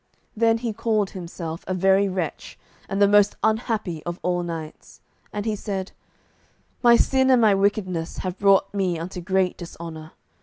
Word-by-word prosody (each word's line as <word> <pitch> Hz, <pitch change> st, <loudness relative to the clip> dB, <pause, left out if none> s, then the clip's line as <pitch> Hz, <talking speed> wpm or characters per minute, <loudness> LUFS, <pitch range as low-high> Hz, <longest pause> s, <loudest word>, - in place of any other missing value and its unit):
Then 225 Hz, +1 st, +3 dB
he 230 Hz, -1 st, -3 dB
called 215 Hz, -2 st, 0 dB
himself 170 Hz, -2 st, -7 dB
a 185 Hz, -, -1 dB
very 195 Hz, +2 st, +3 dB
wretch, 185 Hz, -4 st, -4 dB, 0.3 s
and 195 Hz, -, -2 dB
the 200 Hz, -, +6 dB
most 205 Hz, 0 st, +4 dB
unhappy 220 Hz, -7 st, -1 dB
of 175 Hz, +1 st, -5 dB
all 180 Hz, 0 st, 0 dB
knights. 165 Hz, -3 st, -7 dB, 0.3 s
And 205 Hz, 0 st, -4 dB
he 220 Hz, -1 st, 0 dB
said: 195 Hz, -2 st, -4 dB, 0.9 s
"My 240 Hz, -1 st, +7 dB
sin 265 Hz, +2 st, +3 dB
and 255 Hz, -2 st, +6 dB
my 215 Hz, -3 st, +5 dB
wickedness 195 Hz, -4 st, -1 dB
have 185 Hz, 0 st, -4 dB
brought 195 Hz, -1 st, +4 dB
me 185 Hz, -4 st, 0 dB
unto 180 Hz, +2 st, -6 dB
great 190 Hz, 0 st, 0 dB
dishonour. 165 Hz, -2 st, -9 dB
195 Hz, 160 wpm, -23 LUFS, 175-210 Hz, 0.9 s, My